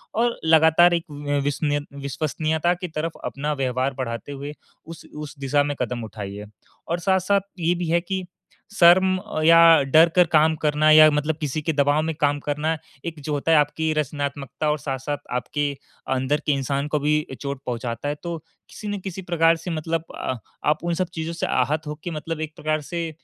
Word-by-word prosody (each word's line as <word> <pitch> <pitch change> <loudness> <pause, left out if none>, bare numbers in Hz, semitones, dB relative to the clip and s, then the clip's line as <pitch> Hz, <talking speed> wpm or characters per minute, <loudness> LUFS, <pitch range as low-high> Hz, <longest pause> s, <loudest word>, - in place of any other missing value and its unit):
और 235 +2 +1
लगातार 160 +2 +6
एक 170 -1 -1
अ, 145 0 -2
विशनीय 145 +1 -1 0.3
विश्वसनीयता 155 +4 0
की 180 0 -6
तरफ 160 0 -3
अपना 150 +2 -2
व्यवहार 130 -1 -1
बढ़ाते 115 0 -4
हुए, 140 +1 -6 0.3
उस 165 -1 -10
उस 150 -1 -8
दिशा 140 +1 +2
में 145 0 -2
कदम 125 -1 -2
उठाइए। 105 -1 -7 0.4
और 170 +1 -1
साथ-साथ 190 +2 +2 0.2
ये 170 +1 +2
भी 175 -1 -3
है 170 +1 +3
कि 190 +1 -4 0.5
शर्म 185 0 +5
अ, 155 -3 -5
या 165 0 +7
डर 160 +5 +5
कर 180 -1 +6
काम 160 +1 +5
करना 150 0 +3
या 155 0 +9
मतलब 150 +1 0
किसी 150 +1 -2
के 160 +1 -1
दबाव 145 +1 +2
में 160 0 -2
काम 145 0 +2
करना, 150 +3 -1 0.3
एक 165 -2 -5
जो 150 +1 -3
होता 145 +3 0
है, 160 - +6
आपकी 155 +2 +1
रचनात्मकता 145 -1 -2
और 150 - 0
साथ-साथ 135 +1 -3 0.2
आपके 145 +3 -1 0.4
अंदर 130 +3 0
के - - +2
इंसान 140 +1 -1
को 150 0 0
भी 150 +1 +2
ए 130 - -6
चोट 140 -1 -4
पहुँचाता 120 +1 -4
है, 145 - -2
तो 170 -1 -3 0.3
किसी 210 - -9
न 205 -1 -3
किसी 190 0 -6
प्रकार 165 -2 +3
से 170 +2 -6
मतलब 160 +1 -2
अ, 130 - -3 0.3
आप 150 +2 +1
उन 175 - 0
सब 185 +1 -1
चीज़ों 165 0 -4
से 170 - -2
आहत 150 +5 0
हो 150 - -4
के 175 - -4
मतलब 160 +1 -5
एक 155 -1 -5
प्रकार 155 0 -1
से 170 -1 -2
155 Hz, 200 wpm, -23 LUFS, 145-165 Hz, 0.5 s, या